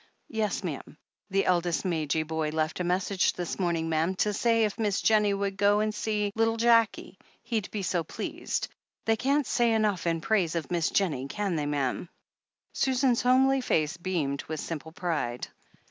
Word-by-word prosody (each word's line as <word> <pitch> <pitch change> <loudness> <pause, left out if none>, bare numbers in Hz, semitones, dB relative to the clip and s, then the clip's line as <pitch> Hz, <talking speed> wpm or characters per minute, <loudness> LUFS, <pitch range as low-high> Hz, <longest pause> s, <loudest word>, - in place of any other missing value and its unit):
"Yes, 215 -2 -1
ma'am. 150 -3 -6 0.3
The 195 0 +1
eldest 175 0 +1
Madge 160 -3 0
boy 160 -1 -2
left 155 +2 -1
a - - 0
message 180 +2 +1
this 175 +1 -4
morning, 170 -3 0
ma'am, 165 +3 0
to 210 +2 +1
say 230 +2 +2
if 210 +2 -4
Miss 210 -3 +1
Jennie 210 -2 +3
would 195 -1 -2
go 205 +1 +4
and 215 0 0
see 210 -1 -1
little 225 +1 +1
Jackie, 230 -1 +2 0.2
he'd 220 -5 -2
be 205 -2 -4
so 175 -2 0
pleased. - - -4 0.4
They 225 - +3
can't 275 +5 +1
say 235 -2 +2
enough 210 -6 +1
in 165 -1 +1
praise 175 -2 +1
of 165 0 -3
Miss 170 -2 +1
Jennie, 150 -9 0
can 195 +5 -2
they, 150 -2 -1
ma'am 145 +3 -1 0.3
?" - - -53
Susan's 260 -2 +2
homely 265 +2 +4
face 160 -8 +1
beamed 165 -6 -2
with 155 -1 -4
simple 160 0 -5
pride. 150 -9 -2
190 Hz, 175 wpm, -28 LUFS, 160-220 Hz, 0.4 s, go